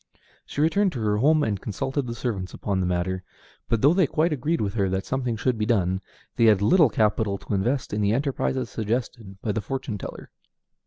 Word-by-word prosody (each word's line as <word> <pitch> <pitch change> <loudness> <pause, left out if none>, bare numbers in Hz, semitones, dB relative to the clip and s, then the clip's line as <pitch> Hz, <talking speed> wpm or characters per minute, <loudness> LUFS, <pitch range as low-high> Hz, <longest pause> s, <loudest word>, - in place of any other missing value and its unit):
She 145 - -3
returned 185 +5 +3
to 125 - -4
her 105 -1 +1
home 150 +6 +4
and 100 -3 -1
consulted 135 +6 -2
the 115 - -4
servants 100 -7 -3
upon 100 -2 -2
the 90 - 0
matter; 90 +1 -1 0.5
but 115 -2 +1
though 145 +4 +6
they 185 -4 +3
quite 160 +4 +1
agreed 150 +5 -1
with 100 -2 -1
her 100 -4 +1
that 95 +1 -2
something 125 -3 -1
should 120 0 0
be 105 - +1
done, 95 -4 +1 0.4
they 115 - +4
had 105 -3 +6
little 160 - +5
capital 105 -2 +1
to 105 - -6
invest 120 +7 0
in 105 - 0
the 100 0 +2
enterprises 130 0 0
suggested 110 -3 -3
by 110 - 0
the 110 +2 -2
fortune 125 -2 -4
teller. - - -8
115 Hz, 210 wpm, -25 LUFS, 100-135 Hz, 0.5 s, though